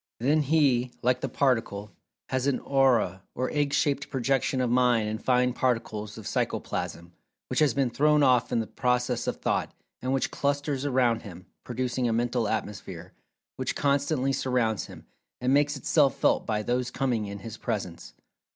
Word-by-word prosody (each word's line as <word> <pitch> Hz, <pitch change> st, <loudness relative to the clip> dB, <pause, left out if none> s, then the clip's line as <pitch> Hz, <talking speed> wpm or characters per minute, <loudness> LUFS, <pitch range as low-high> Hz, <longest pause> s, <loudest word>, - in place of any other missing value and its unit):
Then 145 Hz, +6 st, +3 dB
he, 135 Hz, -4 st, +2 dB
like 125 Hz, +1 st, +2 dB
the 135 Hz, -, -2 dB
Particle, 115 Hz, -6 st, 0 dB, 0.4 s
has 130 Hz, +1 st, 0 dB
an 140 Hz, -, +1 dB
"Aura" 125 Hz, -9 st, +2 dB
or 130 Hz, +1 st, -1 dB
egg 145 Hz, -2 st, 0 dB
shaped 140 Hz, -1 st, 0 dB
projection 135 Hz, 0 st, 0 dB
of 125 Hz, -2 st, +1 dB
Mind 120 Hz, -3 st, +3 dB
and 110 Hz, +1 st, -4 dB
fine 125 Hz, -1 st, +2 dB
particles 115 Hz, -4 st, -2 dB
of 110 Hz, -, -9 dB
Psychoplasm, 85 Hz, 0 st, -3 dB, 0.4 s
which -, -, 0 dB
has 150 Hz, -5 st, +3 dB
been 135 Hz, -3 st, +1 dB
thrown 150 Hz, +3 st, +3 dB
off 125 Hz, -3 st, +3 dB
in 115 Hz, -, +2 dB
the -, -, -4 dB
process 125 Hz, 0 st, -1 dB
of -, -, 0 dB
Thought, -, -, -2 dB, 0.3 s
and 130 Hz, -, -2 dB
which 135 Hz, -1 st, 0 dB
clusters 145 Hz, -1 st, -1 dB
around 125 Hz, -4 st, +2 dB
him, 90 Hz, -4 st, -11 dB, 0.2 s
producing 125 Hz, 0 st, -2 dB
a 115 Hz, -, +1 dB
"Mental 120 Hz, 0 st, 0 dB
Atmosphere," 95 Hz, -5 st, -5 dB, 0.4 s
which 130 Hz, -1 st, -2 dB
constantly 140 Hz, -1 st, +1 dB
surrounds 125 Hz, -5 st, 0 dB
him, -, -, -12 dB, 0.3 s
and 125 Hz, +2 st, +1 dB
makes 145 Hz, 0 st, +2 dB
itself 140 Hz, 0 st, +3 dB
"felt" -, -, +2 dB
by 105 Hz, -1 st, 0 dB
those 125 Hz, +2 st, -1 dB
coming 120 Hz, -6 st, -1 dB
in 100 Hz, 0 st, -6 dB
his 110 Hz, +2 st, -8 dB
presence. 85 Hz, -, -4 dB
125 Hz, 170 wpm, -27 LUFS, 115-135 Hz, 0.4 s, Then